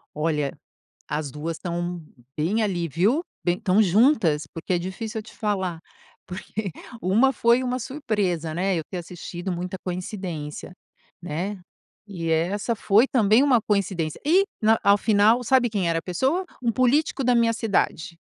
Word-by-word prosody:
Olha, 150 -2 -1 0.5
as 150 -1 -3
2 155 +3 -4
estão 175 0 -4 0.4
bem 180 +9 +1
ali, 175 -5 -1
viu? 200 - +1 0.2
Bem 175 0 +1
estão 195 +2 +3
juntas 195 - +3
porque 165 +3 -3
é 175 - +2
difícil 215 +5 -5
eu - - -8
te - - -15
falar 190 -6 -2 0.5
porque 195 +2 -5 0.3
uma 225 +9 +3
foi 235 +2 +3
uma 250 0 -1
surpresa, 205 - -2
né, 185 +3 0
eu 160 - -2
ter 185 - -5
assistido, 175 +1 -6
muita 180 +2 -4
coincidência, 180 -5 -5 0.5
né. 180 +5 -4 0.5
E 170 -5 -4
essa 185 +8 0
foi 215 +3 +4
também 225 0 +4
uma 265 -4 +4
coincidência, 190 -7 -1
e 365 +6 +4 0.2
na 220 +1 +4
ao 200 0 +6
final 215 +3 +3
sabe 245 0 +3
quem 195 -5 0
era 165 0 +1
a - - -10
pessoa? 265 - 0 0.2
Um 235 - +2
político 255 +5 +2
da 250 0 +3
minha 230 -1 +4
cidade. 190 -7 -1
195 Hz, 155 wpm, -24 LUFS, 170-230 Hz, 0.5 s, ao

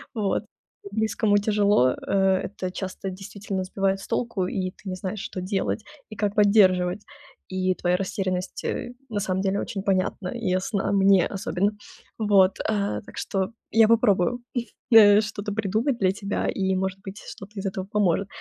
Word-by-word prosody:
Вот. 210 0 0 0.5
Близкому 215 -1 +1
тяжело. 205 - +3
Э, 190 -1 +1
это 185 -2 -5
часто 190 +1 -5
действительно 195 0 -5
сбивает 195 +1 0
с - - -10
толку, 225 -7 -1
и 185 -1 -2
ты 190 - -10
не 185 - -3
знаешь, 185 +2 -5
что 185 - -5
делать 195 +3 -2 0.3
и 215 - -9
как 205 0 -1
поддерживать. 200 -2 +4 0.5
И 185 0 0
твоя 180 0 +1
растерянность, 185 -1 -3
э, 245 - -3 0.2
на 205 -2 -2
самом 190 -2 -1
деле 195 0 0
очень 200 -5 -4
понятна 185 -1 0
и 235 -2 -5
ясна 190 +3 0
мне 195 -2 +5
особенно. 195 0 -1 0.5
Вот, 200 -3 +4
а, 205 -2 -1
так - - -14
что 195 -2 -1 0.2
я 225 -1 +6
попробую, 230 -1 +3 0.5
э, 210 -1 +8
что-то 210 -1 -5
придумать 220 +5 0
для 190 -1 +3
тебя, 200 0 -3
и, 190 -1 0
может 190 0 -2
быть, 195 +1 -8
что-то 195 +1 -9
из 195 - -5
этого 190 -1 -3
поможет. 195 -2 +1
195 Hz, 165 wpm, -25 LUFS, 185-210 Hz, 0.5 s, э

